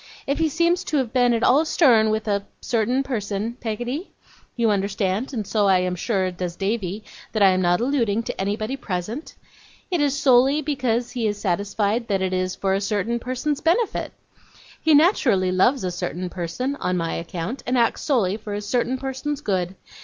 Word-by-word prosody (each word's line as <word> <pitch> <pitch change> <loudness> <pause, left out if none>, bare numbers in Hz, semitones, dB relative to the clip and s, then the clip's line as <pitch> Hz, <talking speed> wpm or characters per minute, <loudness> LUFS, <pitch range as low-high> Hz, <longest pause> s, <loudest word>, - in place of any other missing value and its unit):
If 280 +3 -1
he 325 -1 +2
seems 340 +4 +1
to 300 - 0
have 255 -4 -1
been 245 -2 +4
at 230 0 +1
all 280 +5 +5
stern 245 -9 +4
with 220 0 -1
a 200 -1 0 0.2
certain 245 +3 0
person, 220 -3 -3
Peggotty 245 - -3 0.5
you 230 -3 +2
understand, 200 +3 -1
and 220 -6 -3
so 205 0 +1
I 190 -1 +5
am 180 0 -1
sure 190 0 0
does 180 -1 -5
Davy, 200 0 -2 0.3
that 215 -2 +2
I 195 - +8
am 185 0 +1
not 175 +1 +2
alluding 235 -4 +1
to - - -4
anybody 215 +5 -2
present 220 - -5 0.6
it 350 -4 +1
is 285 -1 +1
solely 270 +1 +4
because 245 -4 -1
he 240 -3 -1
is 205 -1 -1
satisfied 205 +4 -1
that 195 -2 0
it 185 0 -1
is 185 0 -1
for 195 -1 0
a 195 - 0
certain 210 +3 -1
person's 260 +4 -2
benefit. 390 +7 +1 0.7
He 315 -2 +5
naturally 245 - +3
loves 230 +7 +3
a 180 - -1
certain 180 0 -4
person, 190 +11 -3
on 180 -6 -1
my 165 -1 -1
account; 170 +9 -4
and 250 +1 +1
acts 235 -1 +2
solely 215 -9 +1
for 210 -2 -6
a 205 - -3
certain 245 +4 0
person's 270 +2 -4
good. 185 - -1
220 Hz, 190 wpm, -23 LUFS, 195-260 Hz, 0.7 s, I